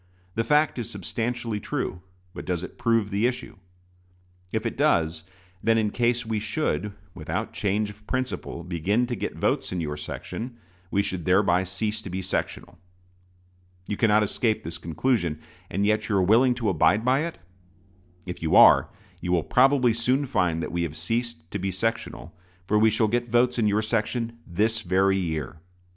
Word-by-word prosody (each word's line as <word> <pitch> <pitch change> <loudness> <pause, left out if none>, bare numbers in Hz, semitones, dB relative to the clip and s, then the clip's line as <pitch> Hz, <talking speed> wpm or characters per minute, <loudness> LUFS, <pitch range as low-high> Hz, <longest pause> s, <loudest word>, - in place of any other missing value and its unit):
The 115 - 0
fact 150 +2 +2
is 115 - -4
substantially 115 +3 -3
true; 90 - -3 0.3
but - - -7
does 90 -1 -2
it - - -9
prove 115 -3 +2
the 105 +4 +2
issue? 125 - -5 0.9
If 110 +1 -2
it 115 - -2
does, 80 - +1 0.4
then 115 0 +3
in 105 -2 +1
case 120 0 +1
we 110 -1 -1
should, 105 -1 -1 0.2
without 90 +7 -4
change 105 +1 0
of 105 +1 -18
principle, 130 -9 -3
begin 90 +7 0
to 120 0 -3
get - - -4
votes - - 0
in 90 - -2
your 75 -3 -3
section, 115 +10 -6 0.3
we 100 +1 +1
should 95 -4 -4
thereby 90 -1 +3
cease 105 +3 -3
to 100 - -8
be 95 +1 -4
sectional. 95 - -4 1.1
You 105 - -2
cannot 105 -1 +4
escape 110 +2 0
this 80 +1 -6
conclusion; 85 - 0 0.3
and 100 +3 0
yet 110 +1 +1
are 105 - +1
you 95 - +4
willing 120 +6 +4
to 115 -4 -1
abide 100 +5 +3
by 130 +2 +4
it? 170 - -8 0.9
If 90 -1 -6
you 80 - +1
are, - - +8 0.3
you 90 - -3
will 85 -3 +2
probably 130 -2 +4
soon 125 +5 +1
find 90 -10 0
that - - -4
we 85 - -1
have 80 -3 -3
ceased 115 -1 -3
to 100 - -3
be 95 +1 -1
sectional, 115 -3 -3 0.3
for 105 +3 +2
we 110 +1 +5
shall 110 +1 +2
get 120 +2 0
votes 120 +1 +2
in 110 - +3
your 105 +1 +2
section 115 +1 -1
this 110 +5 0
very 95 +1 +2
year. 80 -3 -3
105 Hz, 180 wpm, -25 LUFS, 90-115 Hz, 1.1 s, are